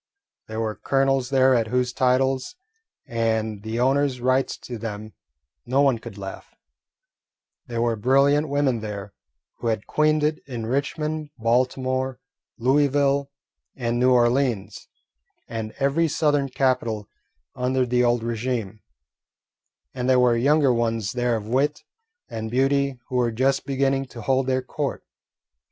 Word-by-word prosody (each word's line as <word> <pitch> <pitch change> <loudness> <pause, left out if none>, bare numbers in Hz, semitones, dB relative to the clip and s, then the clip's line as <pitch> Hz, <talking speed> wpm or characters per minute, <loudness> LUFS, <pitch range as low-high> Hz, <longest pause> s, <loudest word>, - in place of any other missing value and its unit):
There 110 0 -5
were 110 -1 -1
colonels 135 +1 +1
there 130 -1 +4
at 115 -3 +2
whose 125 +1 0
titles 130 - +1 0.5
and 110 -2 -1
the 110 +2 -4
owners' 135 +1 +2
rights 130 +2 +1
to 120 -3 -8
them 110 -1 -6 0.5
no 135 +3 +2
one 135 -5 +3
could 115 -3 -10
laugh; 95 -1 -8 1.1
there 115 -1 -1
were 120 -1 +1
brilliant 140 +6 +3
women 140 -4 +1
there 105 -2 -6 0.5
who 120 - -3
had 110 -2 -1
queened 155 0 +2
it 150 +1 +1
in 120 -4 -5
Richmond, 150 +4 -2
Baltimore, 130 +2 0 0.4
Louisville, 140 +2 +2 0.5
and 120 -2 -1
New 125 +1 +4
Orleans, 120 -3 +1 0.6
and 110 -1 -5
every 140 +4 +2
Southern 145 -2 +1
capital 125 -5 0 0.5
under 130 +1 0
the 125 0 +2
old 120 -1 +2
regime, 115 -3 -3 1.1
and 125 +1 -2
there 130 - +5
were 125 -1 +4
younger 140 +2 +3
ones 115 -3 -1
there 120 -1 0
of 110 -2 -4
wit 135 +6 0 0.4
and 110 0 -5
beauty 135 +2 +1
who 125 - -1
were 120 -1 +2
just 130 +4 0
beginning 135 0 0
to 120 - -10
hold 130 +3 +1
their 130 0 +1
court. 140 +2 -4
125 Hz, 140 wpm, -24 LUFS, 115-135 Hz, 1.1 s, there